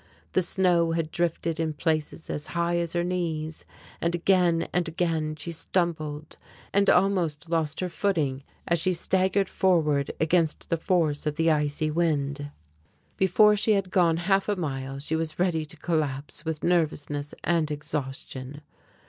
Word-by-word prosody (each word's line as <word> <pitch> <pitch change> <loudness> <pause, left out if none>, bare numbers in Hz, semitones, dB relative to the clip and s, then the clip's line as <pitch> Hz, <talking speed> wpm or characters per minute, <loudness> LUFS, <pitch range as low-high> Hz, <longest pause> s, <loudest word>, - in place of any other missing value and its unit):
The 185 - +3
snow 175 -2 +2
had 165 -1 -2
drifted 165 -1 -1
in 160 -1 0
places 155 +1 -2
as 150 - -4
high 170 0 +1
as 170 -1 -2
her 175 0 +1
knees, 165 -3 -3 0.4
and 170 +1 +1
again 175 -2 +2
and 180 -1 +1
again 160 -2 -1
she 165 +3 -5
stumbled 155 -3 -2 0.3
and 200 0 +4
almost 175 -4 +2
lost 160 -1 0
her 185 - 0
footing 160 -8 -1 0.3
as 170 0 +2
she 185 +3 +2
staggered 190 +3 +1
forward 155 -8 +2
against 160 0 +1
the 165 - +3
force 160 -3 0
of 150 - -1
the 165 +1 +3
icy 150 0 0
wind. 145 -3 0 0.7
Before 210 +3 +5
she 215 +1 +3
had 195 -2 0
gone 170 -4 +3
half 195 +3 +1
a 205 - +2
mile 135 -6 -4
she 150 +3 -2
was 160 -1 -2
ready 175 -3 +1
to 160 - -7
collapse 150 -2 -2
with 160 -1 -3
nervousness 150 -4 0
and 165 -2 +1
exhaustion. 145 -2 -5
165 Hz, 155 wpm, -26 LUFS, 150-175 Hz, 0.7 s, Before